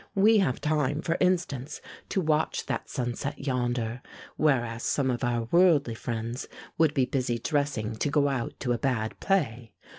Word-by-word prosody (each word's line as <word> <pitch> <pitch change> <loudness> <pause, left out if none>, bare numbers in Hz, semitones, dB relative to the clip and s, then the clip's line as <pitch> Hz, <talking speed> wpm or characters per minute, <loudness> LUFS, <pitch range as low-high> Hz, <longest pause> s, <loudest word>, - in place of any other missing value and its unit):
We 210 +2 +5
have 160 -11 +1
time, 150 -1 0
for 165 - 0
instance, 170 -7 0 0.3
to 190 - 0
watch 155 -1 0
that - - -3
sunset 125 +1 -3
yonder, 120 -2 -1 0.3
whereas 120 -6 +1
some 130 +1 +1
of 120 +1 -3
our 120 -1 +1
worldly 165 -9 +4
friends 115 +1 -4 0.3
would 160 -2 +4
be 130 -3 +3
busy 125 -3 -1
dressing 140 -6 -1
to 145 - 0
go 145 0 +3
out 130 -4 -3
to 125 - 0
a 120 - -2
bad 115 -5 -1
play. 125 - 0
135 Hz, 160 wpm, -28 LUFS, 120-155 Hz, 0.3 s, We